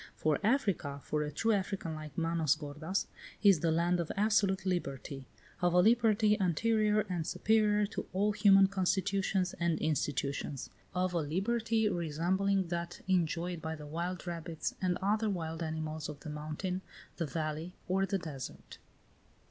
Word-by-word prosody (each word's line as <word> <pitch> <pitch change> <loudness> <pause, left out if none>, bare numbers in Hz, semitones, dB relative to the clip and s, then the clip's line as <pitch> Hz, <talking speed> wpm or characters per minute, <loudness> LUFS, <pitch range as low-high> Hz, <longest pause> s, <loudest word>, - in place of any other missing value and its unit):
For 155 -2 +1
Africa, 200 - +1
for 150 - -1
a 150 - -1
true 225 +10 0
African 195 -4 -1
like 155 -2 -8
Manos 165 -3 +2
gordas, 155 +5 -3 0.4
is 200 -5 +7
the 165 - +1
land 170 +2 +2
of 170 - -2
absolute 200 -2 +2
liberty; 140 -6 -3 0.3
of 175 -1 +3
a - - +7
liberty 220 0 +4
anterior 215 +4 +2
and 180 -5 -3
superior 210 -1 +3
to 205 - -5
all 205 +3 +2
human 200 -2 +6
constitutions 190 0 0
and 170 -2 +1
institutions; 140 -3 -2 0.2
of 180 0 +1
a 170 - +1
liberty 220 +8 +1
resembling 185 +2 0
that 170 0 -4
enjoyed 175 -1 0
by 160 0 -3
the 150 -1 -9
wild 170 +5 -4
rabbits 170 -2 -4
and 180 -1 +1
other 215 +2 +2
wild 165 -4 -3
animals 155 -1 -3
of 150 -1 -8
the 155 - -6
mountain, 155 +5 -3 0.4
the 165 - -1
valley, 155 +3 -3
or 195 +1 +1
the 195 - 0
desert. 155 -7 -8
175 Hz, 150 wpm, -32 LUFS, 155-200 Hz, 0.4 s, is